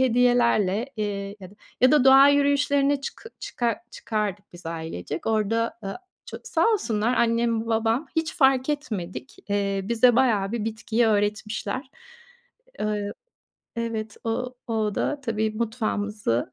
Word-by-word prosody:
hediyelerle, 240 -4 +3
eee, 200 -1 -3
ya 185 - -10
da, 205 - -18 0.3
ya 255 +3 +6
da 295 -4 +5
doğa 270 +1 +8
yürüyüşlerine 285 0 +3
çıkı 450 +10 -8
çıkar 235 -3 -2
çıkardık 205 -3 -4
biz 175 -1 -11
ailecek. 160 - -5
Orada, 225 +1 0
ııı, 195 - -4 0.3
ço - - -7
sağ - - +1
olsunlar, 235 - 0
annem 230 -1 +1
babam 225 +5 +1
hiç 320 0 0
fark 265 -3 +3
etmedik. 185 - -5
Eee, 200 -1 0
bize 235 +3 +4
bayağı 220 -6 +2
bir 225 -3 -2
bitkiyi 225 +1 0
öğretmişler. 210 +4 -1 0.9
Iıı, 210 -1 -2 0.6
evet, 220 -2 -4
o 250 +2 -3
o 215 -2 -1
da 290 -1 -1
tabii 220 -3 -1
mutfağımızı 210 - -2
225 Hz, 130 wpm, -25 LUFS, 205-250 Hz, 0.9 s, doğa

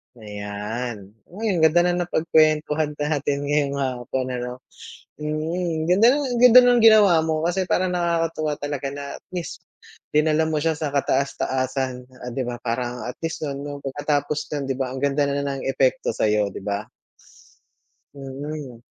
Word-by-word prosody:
Ayan, 105 0 -6 0.2
uy 215 +4 -2
ang 180 - 0
ganda 160 +2 +5
ng 175 - -1
napagkwentuhan 155 -2 +2
natin 145 -1 -1
ngayon 145 -1 0
hapon 130 -1 -2
ano. 125 0 -5 0.5
Mm, 160 +2 -2
ganda 195 +6 +5
nung, 290 +1 0 0.2
ganda 250 0 +10
ng 245 -1 +5
ginawa 215 -5 +7
mo 160 -1 0
kasi 190 +2 0
parang 185 0 0
nakakatuwa 165 -3 -1
talaga 145 -1 -3
na 140 0 -6
at - - -14
least, 175 -4 -6 0.5
dinala 155 +1 +3
mo 155 - 0
siya 160 +1 0
sa 150 -2 -3
kataas-taasan 130 -2 -1 0.2
o 125 - -8
di 130 - -1
ba, 120 -1 -5
parang 120 +1 -3
at 125 - -5
least 165 -1 -3
nun 140 0 -5
yung 145 0 -6
pagkatapos 145 +2 -1
nun 145 -2 -2
di 135 - -1
ba, 130 -1 -3
ang 130 - -5
ganda 140 +1 +1
na 140 0 0
ng 140 -1 -3
epekto 130 -2 +1
sayo, 105 -2 +1
di - - -7
ba? 100 +1 -3 1.3
Mm. 140 -2 -7
145 Hz, 160 wpm, -23 LUFS, 130-160 Hz, 1.3 s, ganda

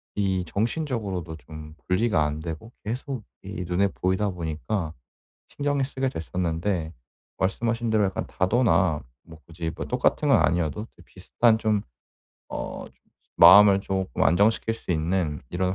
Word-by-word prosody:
이 95 -3 0
정신적으로도 105 - -2
좀 75 +2 -11
분리가 90 -3 +2
안 75 +1 -3
되고 80 +8 -7
계속 125 +1 -4 0.2
이 95 -1 -5
눈에 95 +3 +2
보이다 95 +2 0
보니까 85 +1 -3 0.6
신경을 145 -1 -1
쓰게 135 -1 -2
됐었는데 85 - -2 0.5
말씀하신 115 +5 -1
대로 110 -2 +3
약간 95 -1 -2
다도나 95 - +2 0.2
뭐 80 -1 -14
굳이 85 0 -5
뭐 - - -5
똑같은 - - +1
건 - - +6
아니어도 85 +3 0
이제 - - -19
비슷한 115 -2 +1
좀 105 -2 +1 0.7
어 - - -5 0.5
마음을 100 +3 +8
조금 95 -8 -2
안정시킬 105 +7 +3
수 115 - -7
있는 80 -2 -1
이런 90 +1 -1
95 Hz, 295 characters per minute, -25 LUFS, 80-110 Hz, 0.7 s, 마음을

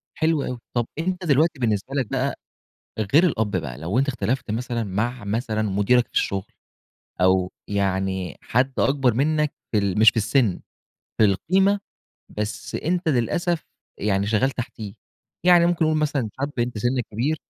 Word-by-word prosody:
حلو 160 -2 +1
أوي، 125 -1 -4
طب 120 -1 +1
أنت 180 +2 -2
دلوقتي 155 0 +2
بالنسبة 115 +2 -1
لك 130 -5 0
بقى 135 +1 0 0.8
غير 160 +5 +7
الأب 110 - +1
بقى، 70 -8 -4
لو 85 - -1
أنت 135 +2 +2
اختلفت 125 -1 -1
مثلًا 120 +1 -2
مع 110 +4 -2
مثلًا 110 +1 -1
مديرك 105 +4 +2
في - - -38
الشغل، 95 -1 0 0.8
أو 95 0 +3 0.2
يعني 95 -4 -1
حد 130 +3 +1
أكبر 135 -4 +2
منك 150 +3 +1 0.2
في 110 - +3
ال 100 -1 0
مش 110 0 +8
في - - -21
السِّن 110 -2 +2 0.6
في - - +4
القيمة، 190 - +2 0.5
بس 105 0 -5
أنت 175 +1 -1
للأسف 160 +6 0 0.3
يعني 100 -1 0
شغال 110 +5 +2
تحتيه، 115 -5 -6 0.5
يعني 175 -1 +6
ممكن 175 -1 +2
نقول 155 0 +2
مثلًا 145 -6 0
شاب 140 +1 -1
أنت 120 -1 -1
سنّك 120 +3 0
كبير 130 +9 0
120 Hz, 160 wpm, -23 LUFS, 105-145 Hz, 0.8 s, مش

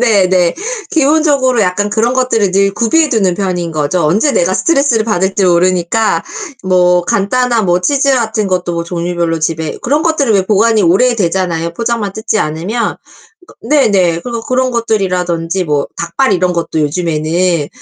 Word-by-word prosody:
네네. 185 -7 +2 0.4
기본적으로 285 -6 +2
약간 200 +3 0
그런 230 +3 +1
것들을 230 -6 +1
늘 195 0 +1
구비해 305 +7 +2
두는 195 -8 +1
편인 180 -3 -3
거죠. 155 +3 -1
언제 215 - +2
내가 175 +2 +1
스트레스를 275 -9 +1
받을지 190 -2 0
모르니까 180 +4 +1 0.4
뭐 180 -1 +3
간단한 235 +4 0
뭐 175 +1 +2
치즈 280 +6 +1
같은 220 -3 -1
것도 180 -1 -1
뭐 170 0 -3
종류별로 170 -1 -2
집에 160 0 -3
그런 290 +5 0
것들은 290 -9 +1
왜 195 - +3
보관이 215 +1 +2
오래되잖아요, 180 -4 +1
포장만 230 -3 -2
뜯지 220 0 -2
않으면. 180 +10 -2 0.5
그니까 - - -18 0.3
네네. 180 -5 +1
그래서 235 +1 -5
그런 255 +1 0
것들이라든지 185 -6 -1
뭐 150 -3 -1
닭발 190 +7 0
이런 180 0 0
것도 165 -2 -2
요즘에는 160 +1 -1
190 Hz, 365 characters per minute, -13 LUFS, 175-230 Hz, 0.5 s, 뭐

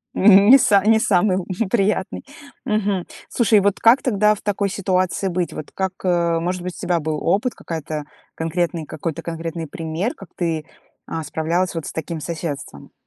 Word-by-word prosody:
Не 205 +6 +8
са 200 -4 +4
не 220 0 +5
самый 190 -2 +2
л 185 - -3 0.3
приятный. 195 -3 0 0.4
Мгм. 205 -4 0 0.2
Слушай, 220 -3 +4
вот 200 0 +1
как 235 +4 +5
тогда 210 -3 +3
в - - -13
такой 200 -1 -1
ситуации 185 0 0
быть? 180 -1 -2
Вот, 150 - -8
как, 190 -1 -2
э 170 -2 +2
Может 180 +1 -2
быть, 180 0 -5
у - - -12
тебя 175 -2 +1
был 155 0 -2
опыт, 210 +8 +1
какая-то, 155 -2 -5 0.3
конкретный, 165 0 -2
какой-то 160 +1 -5
конкретный 165 0 -4
пример, 165 - -3
как 195 - -13
ты, 160 -3 -2 0.4
а, 160 - -4
справлялась 165 +5 -1
вот 165 - -4
с - - -5
таким 160 +1 -4
соседством? 160 -3 -6
180 Hz, 170 wpm, -21 LUFS, 165-200 Hz, 0.4 s, Не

